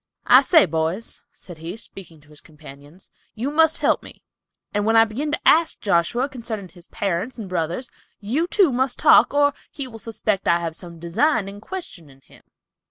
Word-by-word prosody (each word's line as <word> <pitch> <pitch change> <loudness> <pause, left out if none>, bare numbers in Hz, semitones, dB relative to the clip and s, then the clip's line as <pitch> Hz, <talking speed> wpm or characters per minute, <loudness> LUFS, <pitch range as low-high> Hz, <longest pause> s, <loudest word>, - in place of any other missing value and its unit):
"I - - +7
say, 325 - +5
boys," 165 +6 -3
said 175 -4 -14
he, 170 +6 -7
speaking 175 -8 -12
to 145 - -24
his 150 -1 -13
companions, 150 +2 -15 0.2
"you 245 +6 -3
must 320 +1 +3
help - - +1
me, - - -14 0.5
and 205 0 0
when 225 +2 +2
I 225 0 +7
begin 270 +8 -4
to - - -2
ask 330 +1 +4
Joshua 205 +7 +1
concerning 230 -7 -7
his 175 0 -16
parents 200 +6 -3
and 220 -4 -7
brothers, 175 +7 -3 0.3
you, 260 +12 -1
too, 375 -5 +3
must 255 0 -1
talk, - - +5
or 285 0 +3 0.2
he 280 -2 -5
will 225 -3 -11
suspect 215 -2 -3
I 170 0 +3
have 165 -2 -4
some 170 -1 -10
design 195 - 0
in 200 +1 -9
questioning 170 - -9
him." - - -20
205 Hz, 185 wpm, -22 LUFS, 170-255 Hz, 0.5 s, I